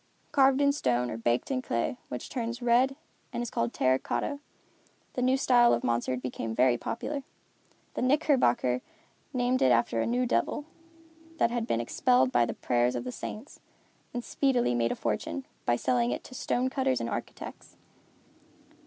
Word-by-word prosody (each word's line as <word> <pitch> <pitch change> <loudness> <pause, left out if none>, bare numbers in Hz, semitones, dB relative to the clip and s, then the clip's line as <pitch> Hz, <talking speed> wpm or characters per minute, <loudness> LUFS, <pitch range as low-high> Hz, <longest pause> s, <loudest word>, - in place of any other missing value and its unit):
Carved 270 -1 +4
in 280 0 +5
stone, 125 - 0
or - - -4
baked 120 - 0
in 260 -1 0
clay, 115 - -2
which 125 - -5
turns 235 -2 -3
red 245 +2 +3 0.4
and 240 -1 -2
is 240 - -5
called 115 0 0
terra 130 0 +2
cotta, 285 -1 -2 0.7
the 250 - -2
new 255 +1 +3
style 245 -3 +5
of 120 - -5
monster 120 +2 0
became 120 -3 -4
very 125 0 +4
popular. 280 - -4 0.7
The - - -3
knickerbocker 255 - +2 0.5
named 250 -1 +1
it 130 - +5
after 115 -1 +2
a - - 0
new 250 +2 +1
devil, 270 +4 0 0.7
that 235 - +2
had 235 -1 -2
been 115 - +1
expelled 125 +2 +2
by 120 -2 +3
the - - -4
prayers 120 +1 +1
of 120 - -2
the 125 - -4
saints, 220 - -8 0.5
and 240 0 -4
speedily 250 - +1
made 115 -1 +1
a - - -1
fortune, 85 +1 -3 0.2
by 120 - +4
selling 120 -1 +1
it 125 - -3
to - - -12
stone 255 0 0
cutters 260 - 0
and 115 - -2
architects. - - -7
170 Hz, 170 wpm, -29 LUFS, -, 0.7 s, in